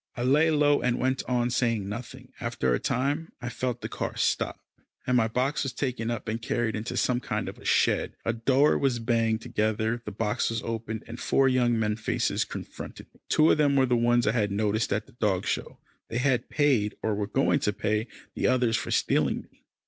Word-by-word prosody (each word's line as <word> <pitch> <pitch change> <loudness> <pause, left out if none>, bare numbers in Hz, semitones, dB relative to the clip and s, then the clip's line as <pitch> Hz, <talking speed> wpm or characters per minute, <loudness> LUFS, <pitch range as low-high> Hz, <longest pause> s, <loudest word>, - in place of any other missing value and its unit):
I 120 - -2
lay 150 +6 +4
low, 145 -2 +3
and 125 -1 +1
went 130 0 0
on 120 -1 +1
saying 115 -5 0
nothing; 125 +4 -8
and 120 - -2
after 65 - 0
a - - +1
time 145 +6 -1
I 120 -1 -4
felt 120 0 -3
the - - -3
car - - -4
stop, - - 0 0.5
and 125 - +1
my 115 -2 +4
box 130 +5 0
was 135 -2 -2
taken 120 -3 -2
up 120 -1 -4
and 110 +2 -2
carried 120 -1 -1
into 110 +3 -4
some 125 -1 +2
kind - - -3
of - - -7
a - - -15
shed, - - +2
a 115 - +1
door 130 +6 +3
was 135 -3 +1
banged 115 -1 +1
together, 110 0 -1
the 105 - -6
box 110 +3 -1
was 115 0 -3
opened, 115 -1 -4
and 115 +1 -8
four 135 - +3
young 125 -2 +2
men 105 -1 0
faces 110 - 0
confronted - - -9
me. - - -25
Two 155 +1 +5
of - - +2
them 145 -2 +3
were 135 -1 +4
the 125 -1 +2
ones 120 0 +3
I - - +3
had 105 -4 0
noticed 105 +2 0
at 105 +1 0
the - - -19
dog 105 -6 0
show. - - -3 0.3
They 115 - -3
had 125 -1 +1
paid, 130 -9 +2
or 110 - +1
were 100 0 -2
going 135 +4 +2
to 105 - +1
pay, 105 +2 -1 0.3
the - - 0
others 125 -3 +2
for - - -4
stealing - - +1
me. - - -32
120 Hz, 220 wpm, -27 LUFS, 110-130 Hz, 0.5 s, Two